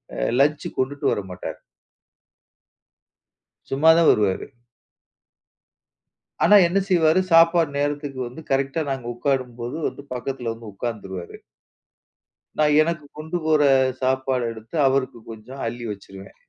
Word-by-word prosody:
அ - - -7 0.2
lunch 150 +1 +1
கொண்டுட்டு 140 +2 -2
வரமாட்டார். 95 -2 -6 2.1
சும்மா 145 +4 +3
தான் 170 -2 +5
வருவாரு. 100 -3 0 2.0
ஆனா, 210 - +7
என்ன 195 +3 +1
செய்வாரு, 165 -1 +4
சாப்பாடு 165 -1 +5
நேரத்துக்கு 145 -2 -2
வந்து 125 +6 -10
கரெக்ட்டா 135 +4 0
நாங்க 135 -3 -4
உட்காரும்போது 125 -2 -2
வந்து, 140 - -8
பக்கத்தில 125 -1 -4
வந்து 115 -2 -11
உட்கார்ந்துருவாரு. 95 -5 -6 1.2
நான் 150 -1 +3
எனக்கு 155 -2 -2
கொண்டு 160 +3 -4
போற 155 -1 +3 0.4
சாப்பாடு 130 -1 0
எடுத்து 110 +5 -11
அவருக்கு 130 -3 0
கொஞ்சம் 120 +5 -10
அள்ளி 120 0 -5
வச்சுருவேன். 100 -1 -11
135 Hz, 110 wpm, -23 LUFS, 115-155 Hz, 2.1 s, ஆனா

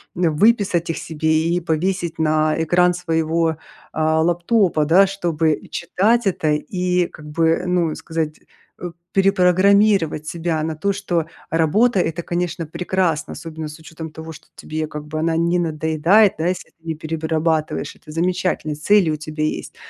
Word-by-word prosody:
м, 170 -3 +1
выписать 205 -4 +2
их 165 - -2
себе 160 0 -3 0.2
и 175 +1 0
повесить 170 +1 -1
на 155 0 +1
экран 180 +2 +3
своего, 165 -2 0 0.3
а, 160 0 +1
лэптопа, 175 -1 +2
да. 180 +6 +6
Чтобы 170 -5 0
и - - -8
читать 215 +7 +1
это 160 -5 0
и 180 +3 0
как 150 - -14
бы, 165 +2 +1
ну, 175 -3 +1
сказать, 160 -2 -4 0.4
э, 175 - -5 0.2
перепрограммировать 195 -3 +3
себя 165 -1 -2
на 160 0 -3
то, 200 +6 -1
что 180 -5 -1 0.3
работа- 190 +7 +3
это, 165 0 -1
конечно, 175 -1 -2
прекрасно, 170 -1 -1
особенно 160 -1 -7
с 150 +1 -10
учетом 160 0 -9
того, 160 +1 -9
что - - -15
тебе 155 0 -4
как 150 -1 -7
бы 155 +1 -5
она 160 0 0
не 170 +1 +1
надоедает, 165 +5 +3
да, 165 - 0
если 180 -1 -3
ты 165 - -43
не 160 - -2
перерабатываешь. 160 0 -2
Это 150 - -14
замечательно, 180 -1 -1
и - - -3
цели 175 +2 +3
у - - -1
тебя 155 0 -5
есть. 155 - -3
165 Hz, 165 wpm, -20 LUFS, 155-180 Hz, 0.4 s, да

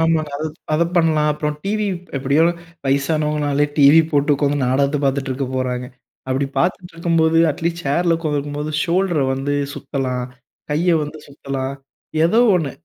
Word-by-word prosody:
ஆமாங்க, 160 -2 +1
அது 155 +2 -3 0.3
அத 165 - +3
பண்ணலாம் 155 -2 +3
அப்புறம் 150 0 -3
டிவி 210 +1 0 0.3
எப்படியோ 140 +4 +3 0.4
வயசானவங்கனாலே 145 +1 +1
டிவி 145 +2 +7
போட்டு 145 +1 +3
உக்காந்து 145 0 0
நாடகத்த 140 +3 +2
பார்த்துட்டு 135 0 0
இருக்க 135 0 -3
போறாங்க 125 -1 -2 0.4
அப்படி 135 +1 0
பார்த்துட்டு 175 0 -1
இருக்கும்போது 165 -1 +2
அட்லீஸ்ட் 170 +3 -3
சேர்ல 170 +4 +2
உட்கார்ந்திருக்கும் 145 -3 -3
போது 150 +1 -3
ஷோல்டர 175 -2 +1
வந்து 140 +2 -2 0.2
சுத்தலாம். 130 -4 -3 0.5
கைய 165 +4 +2
வந்து 150 +1 -6
சுத்தலாம். 140 -1 -5 0.5
ஏதோ 195 +7 +3 0.2
ஒண்ணு. 150 -6 -1
150 Hz, 140 wpm, -20 LUFS, 140-165 Hz, 0.5 s, டிவி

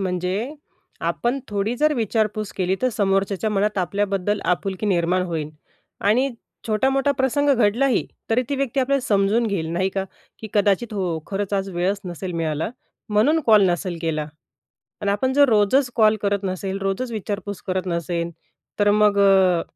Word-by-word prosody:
म्हणजे 185 - -2 0.5
आपण 240 +3 -1
थोडी 210 +3 -1
जर 305 +3 +3
विचारपूस 215 -3 -1
केली 185 0 +1
तर 255 - +3
समोरच्याच्या 195 0 0
मनात 205 0 0
आपल्याबद्दल 195 +2 -1
आपुलकी 190 +3 -1
निर्माण 180 -1 +2
होईल. 160 -3 -3 0.5
आणि 245 +7 +2 0.4
छोटा-मोठा 265 +6 +2
प्रसंग 285 +2 +2
घडलाही 240 +2 +2 0.2
तरी 235 +3 +3
ती 280 - -1
व्यक्ती 270 -1 0
आपल्याला 275 +1 +1
समजून 205 +3 +2
घेईल, 195 -6 -2
नाही 185 +2 +1
का? 195 0 -2 0.3
की 220 - -7
"कदाचित 205 +2 +2
हो, 180 -5 -1
खरंच 200 0 -3
आज 195 0 -1
वेळच 185 +3 -1
नसेल 180 +1 -5
मिळाला 155 +2 -1 0.4
म्हणून 225 +10 +3
कॉल 215 -2 +6
नसेल 175 0 -2
केला." 155 -2 -1 0.7
आणि 205 -1 0
आपण 260 +6 0
जर 285 0 +5
रोजच 230 +5 +3
कॉल 220 -1 +5
करत 200 0 0
नसेल, 190 +1 -3
रोजच 195 +6 -2
विचारपूस 205 -2 -5
करत 185 0 -2
नसेल, 170 0 -2 0.5
तर 205 0 +3
अ, - - +5
मग 210 -1 +3
अ, 190 -3 +4
200 Hz, 160 wpm, -22 LUFS, 185-225 Hz, 0.7 s, कॉल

